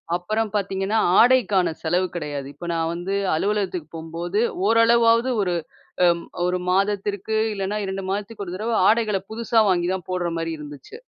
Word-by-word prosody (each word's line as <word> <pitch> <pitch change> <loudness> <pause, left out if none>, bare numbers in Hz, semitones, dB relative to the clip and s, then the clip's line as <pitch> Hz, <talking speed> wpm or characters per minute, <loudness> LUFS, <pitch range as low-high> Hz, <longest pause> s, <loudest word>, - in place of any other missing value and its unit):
அப்பறம் 215 +4 -2
பாத்தீங்கன்னா, 195 +2 0 0.2
ஆடைக்கான 210 -8 +4
செலவு 180 +3 +1
கிடையாது. 145 -4 -4
இப்ப 175 - -9
நான் 165 0 -1
வந்து 180 +3 -3 0.2
அலுவலகத்துக்கு 190 -2 -1
போம்போது, 170 +5 -3 0.3
ஓரளவாவது 230 +2 +4
ஒரு, 180 -2 0 0.5
அ - - +7 0.4
1 180 0 0
மாதத்திற்கு 200 +2 0 0.2
இல்லன்னா 200 +1 -2
2 190 0 -4
மாதத்துக்கு 205 +1 -4
ஒரு 180 +1 -6
தடவ 225 +4 -2 0.2
ஆடைகள 215 -3 +2
புதுசா 230 0 +2
வாங்கி 175 -1 +1
தான் 185 -3 -5
போட்ற 180 -2 -1
மாரி 165 0 -2
இருந்துச்சு. 145 - -10
195 Hz, 145 wpm, -23 LUFS, 175-215 Hz, 0.5 s, அ